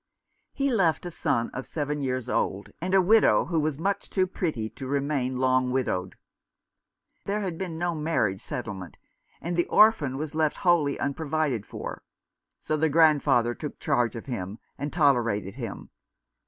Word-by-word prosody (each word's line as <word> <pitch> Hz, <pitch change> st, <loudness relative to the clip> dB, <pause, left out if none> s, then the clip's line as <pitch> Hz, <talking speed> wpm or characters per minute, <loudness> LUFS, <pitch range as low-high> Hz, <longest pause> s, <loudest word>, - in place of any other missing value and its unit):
He 275 Hz, 0 st, 0 dB
left 180 Hz, -6 st, +2 dB
a 175 Hz, -, -4 dB
son 115 Hz, -6 st, -1 dB
of 130 Hz, -, -5 dB
seven 150 Hz, -1 st, -3 dB
years 130 Hz, -2 st, -2 dB
old, 100 Hz, +2 st, -1 dB
and 185 Hz, +2 st, 0 dB
a 190 Hz, -, +6 dB
widow, 220 Hz, +4 st, +5 dB
who 165 Hz, -2 st, 0 dB
was 155 Hz, -2 st, -1 dB
much 195 Hz, +5 st, -2 dB
too 190 Hz, -1 st, +2 dB
pretty 160 Hz, -, -2 dB
to 135 Hz, -, -8 dB
remain 140 Hz, -2 st, -1 dB
long 130 Hz, 0 st, +2 dB
widowed. 95 Hz, -8 st, -1 dB, 1.1 s
There 205 Hz, +1 st, -1 dB
had 185 Hz, -4 st, -3 dB
been 170 Hz, -2 st, -5 dB
no 175 Hz, +1 st, -1 dB
marriage 150 Hz, -12 st, 0 dB
settlement, 100 Hz, -7 st, -6 dB, 0.4 s
and 170 Hz, +1 st, -3 dB
the 175 Hz, -, +1 dB
orphan 185 Hz, -, +4 dB
was 155 Hz, +1 st, -4 dB
left 155 Hz, -1 st, +1 dB
wholly 160 Hz, -5 st, +3 dB
unprovided 145 Hz, -5 st, -1 dB
for; -, -, -6 dB, 0.6 s
so 155 Hz, -, -2 dB
the 160 Hz, +1 st, +2 dB
grandfather 145 Hz, -6 st, +4 dB
took 150 Hz, +3 st, -7 dB
charge 120 Hz, 0 st, +1 dB
of 115 Hz, -, -7 dB
him, 105 Hz, -6 st, -5 dB, 0.2 s
and 145 Hz, +2 st, -4 dB
tolerated 120 Hz, -, +2 dB
him. 115 Hz, -4 st, -7 dB
145 Hz, 160 wpm, -27 LUFS, 125-165 Hz, 1.1 s, a